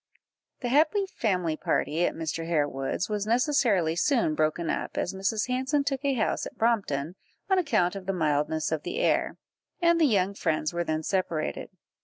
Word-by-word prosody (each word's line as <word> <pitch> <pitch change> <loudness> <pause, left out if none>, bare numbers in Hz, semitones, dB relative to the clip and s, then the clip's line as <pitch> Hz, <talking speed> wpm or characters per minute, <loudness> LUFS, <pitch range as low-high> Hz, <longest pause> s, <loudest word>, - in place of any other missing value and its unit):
The 245 - -2
happy 310 - +3
family 180 - -1
party 160 +2 0
at - - -4
Mr. 165 0 -4
Harewood's 145 +2 -1
was 210 -1 -2
necessarily 230 - +2
soon 230 - +2
broken 155 +2 0
up, - - -3
as 175 - -1
Mrs. 200 +4 -1
Hanson 260 +3 0
took 275 -1 -2
a 280 -1 +1
house 220 - 0
at - - -13
Brompton, 185 -10 0 0.4
on 380 - +5
account 200 - +1
of 190 -1 -8
the - - +2
mildness 155 -2 0
of 160 -2 -1
the - - -5
air, - - +1 0.4
and 340 -1 +3
the - - +6
young 200 -4 +2
friends 155 -5 -1
were 175 0 -1
then 155 -1 -2
separated. 170 -4 -2
190 Hz, 175 wpm, -27 LUFS, 160-255 Hz, 0.4 s, the